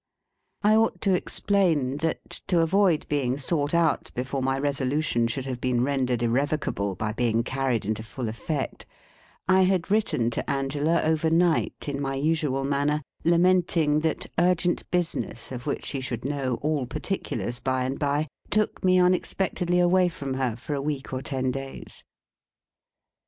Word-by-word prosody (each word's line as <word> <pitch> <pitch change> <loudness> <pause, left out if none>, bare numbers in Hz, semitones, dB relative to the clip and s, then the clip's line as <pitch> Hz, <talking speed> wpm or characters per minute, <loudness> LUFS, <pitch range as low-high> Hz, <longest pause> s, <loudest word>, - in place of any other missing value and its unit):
I 210 +1 +5
ought 225 0 +2
to 195 -3 +3
explain, 170 -8 +1
that, 160 +1 -2 0.2
to 175 -4 +3
avoid 175 -1 +2
being 135 -3 0
sought 145 +1 0
out 165 -3 +2
before 130 +2 -2
my 135 +1 +1
resolution 140 -3 +1
should 130 +3 -3
have 125 -2 -4
been 125 -1 +1
rendered 130 -3 0
irrevocable 120 -5 0
by 105 +2 -2
being 115 -1 +1
carried 130 -4 -1
into 110 +1 -2
full 115 +2 -5
effect, 130 +6 -4 0.6
I 185 0 +5
had 185 0 +1
written 165 - +2
to - - -3
Angela 145 +4 +1
overnight, 160 +2 +1
in 140 -1 -2
my 135 -1 -2
usual 145 -2 0
manner, 145 +2 0 0.2
lamenting 170 -3 +3
that 160 0 -1
urgent 175 0 +1
business, 170 -10 -2
of 125 +2 -6
which 140 - -2
she 135 - -3
should 125 -2 -4
know 135 -3 -1
all 150 -4 0
particulars 120 -6 -3
by 130 -1 0
and 130 +2 -3
by 145 +2 0 0.2
took 215 0 0
me 185 0 +4
unexpectedly 180 0 +1
away 180 +1 +4
from 140 -5 -5
her 130 -4 -1
for 125 +5 -5
a 140 - -1
week 140 -2 -3
or 130 - -2
ten 130 -1 -1
days. 135 +1 -7
145 Hz, 155 wpm, -26 LUFS, 130-170 Hz, 0.6 s, I